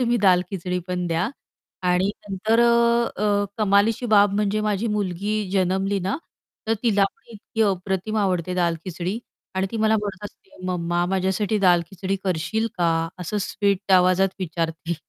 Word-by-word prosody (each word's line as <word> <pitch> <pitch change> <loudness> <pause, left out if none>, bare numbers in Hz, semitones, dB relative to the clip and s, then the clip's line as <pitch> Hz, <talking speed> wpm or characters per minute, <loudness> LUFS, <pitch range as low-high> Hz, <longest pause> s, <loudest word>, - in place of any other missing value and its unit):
तुम्ही 240 -1 +2
दाल-खिचडी 180 -1 +2
पण 180 -1 -2
द्या 170 +4 0 0.6
आणि 185 +3 +2 0.2
नंतर 220 +4 +1
अ, 235 -1 +3
अ, 205 -1 +2
कमालीची 215 +3 +2
बाब 205 -1 +6
म्हणजे 210 0 +1
माझी 210 +1 0
मुलगी 200 +1 -2 0.2
जन्मली 190 +1 +1
ना, 190 +6 -1 0.5
तर 225 - +2
तिला 205 -5 +3
पण 195 - -7
इतकी 220 +1 -3
अप्रतिम 190 +1 -1
आवडते 180 -3 0
दाल-खिचडी. 175 +3 -2 0.4
आणि 190 0 0
ती 230 - -4
मला 220 0 +3
म्हणत 205 -1 -4
असते 195 - -12
"मम्मा 175 -1 0
माझ्यासाठी 190 +3 0
दाल-खिचडी 185 +1 +1
करशील 185 +5 0
का?" 170 -1 +3 0.3
असं 180 +4 -3
स्वीट 200 -1 0
आवाजात 185 +1 +5
विचारते 165 -1 -2
195 Hz, 145 wpm, -23 LUFS, 180-210 Hz, 0.6 s, बाब